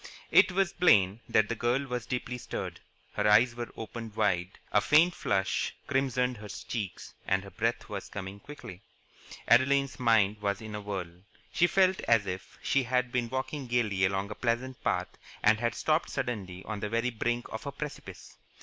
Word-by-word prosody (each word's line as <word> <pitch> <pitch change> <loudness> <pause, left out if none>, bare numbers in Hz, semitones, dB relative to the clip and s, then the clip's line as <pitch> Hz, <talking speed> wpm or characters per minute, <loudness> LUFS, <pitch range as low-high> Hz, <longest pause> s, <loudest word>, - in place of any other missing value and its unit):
It - - +6
was 190 -1 +1
plain 105 - +4
that 110 -1 +4
the - - -1
girl 120 +4 0
was 125 -3 -4
deeply 125 -1 -3
stirred. - - -5 0.3
Her - - +1
eyes 115 +4 +6
were 120 0 -5
opened 115 -1 -7
wide, 90 -1 0
a 105 - +4
faint 160 +7 +5
flush 95 - 0
crimsoned 130 -2 0
her 105 0 -9
cheeks, 105 -2 -5
and 95 0 +1
her 100 - -11
breath 115 +1 -1
was 100 -2 -6
coming 95 0 -6
quickly. 115 -7 -10 0.7
Adeline's 135 +3 +4
mind 110 -4 +3
was 100 -1 0
in 110 -1 -8
a 105 - -4
whirl. 90 -4 -5 0.3
She 175 - +4
felt 190 0 +3
as 115 -3 +4
if 95 0 -6
she 140 - +2
had 125 0 0
been 120 -2 0
walking 130 +2 -3
gaily 110 -6 +1
along 95 +2 0
a - - -2
pleasant 120 +3 -2
path - - -1 0.2
and 110 +1 +5
had 120 0 0
stopped 155 +1 +1
suddenly 95 -6 -4
on 110 -2 -4
the 105 0 -3
very 115 +3 0
brink 120 +1 -1
of - - -6
a - - -2
precipice. - - -8
115 Hz, 180 wpm, -29 LUFS, 100-125 Hz, 0.7 s, It